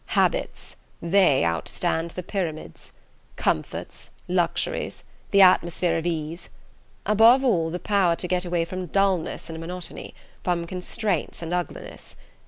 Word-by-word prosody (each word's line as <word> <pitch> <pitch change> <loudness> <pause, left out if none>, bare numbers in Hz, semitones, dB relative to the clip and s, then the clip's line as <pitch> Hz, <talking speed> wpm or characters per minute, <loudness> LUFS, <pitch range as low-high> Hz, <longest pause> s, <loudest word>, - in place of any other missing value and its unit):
Habits - - 0 0.2
they 170 - +4
outstand 85 - -1
the 180 - -4
Pyramids. 170 -5 -5 0.4
Comforts, - - -3 0.2
luxuries, - - -1 0.3
the 200 -1 +6
atmosphere 175 -1 +4
of 165 +1 -1
ease... 165 0 -4 0.6
above 225 +5 +6
all, 175 -11 +2
the 175 - -3
power 190 -3 +2
to 180 - -2
get 180 0 0
away 175 -2 0
from 185 +1 -5
dulness 195 -2 0
and 160 -1 -7
monotony, 175 +1 -6 0.3
from 175 -2 0
constraints 180 0 -3
and 165 +1 -4
uglinesses. 180 -1 -5
175 Hz, 125 wpm, -25 LUFS, 165-190 Hz, 0.6 s, the